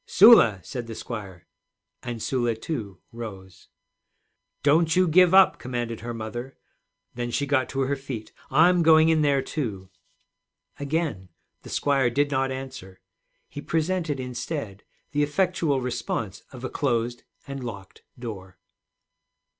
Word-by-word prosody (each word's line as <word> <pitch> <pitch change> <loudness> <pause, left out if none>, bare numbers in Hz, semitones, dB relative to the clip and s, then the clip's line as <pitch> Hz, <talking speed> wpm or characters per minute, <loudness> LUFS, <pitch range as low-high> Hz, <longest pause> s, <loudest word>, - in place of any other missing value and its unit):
'Sula!' 185 - +7
said 120 -2 -6
the 115 - -7
squire; 100 -8 -7 0.6
and 120 -2 -5
Sula, 120 -3 0
too, 110 - -5
rose. 100 -5 -9 1.0
'Don't 155 +3 +4
you 185 0 +4
give 180 +2 +5
up,' 190 0 +6
commanded 120 -2 -4
her 120 +1 -6
mother. 120 +3 -6 0.6
Then 120 0 -3
she 140 +4 -1
got 130 -3 +1
to 135 - -2
her 135 +1 0
feet. 135 -5 -7 0.2
'I'm 170 +5 +5
going 160 0 +6
in 160 -1 +3
there, 140 -2 +2
too.' 100 - -5 0.9
Again 140 - -2 0.3
the - - -12
squire 135 -3 +2
did 145 +4 0
not 135 -1 0
answer. 130 -8 -8 0.5
He 145 - -8
presented 160 -2 -1
instead 125 - -5 0.3
the 145 - 0
effectual 150 -2 +1
response 115 -6 -3
of 130 -2 -11
a 130 - -3
closed 120 -3 -1 0.3
and 140 -1 -6
locked 100 -6 -8 0.2
door. 100 -6 -8
130 Hz, 135 wpm, -25 LUFS, 115-150 Hz, 1.0 s, Sula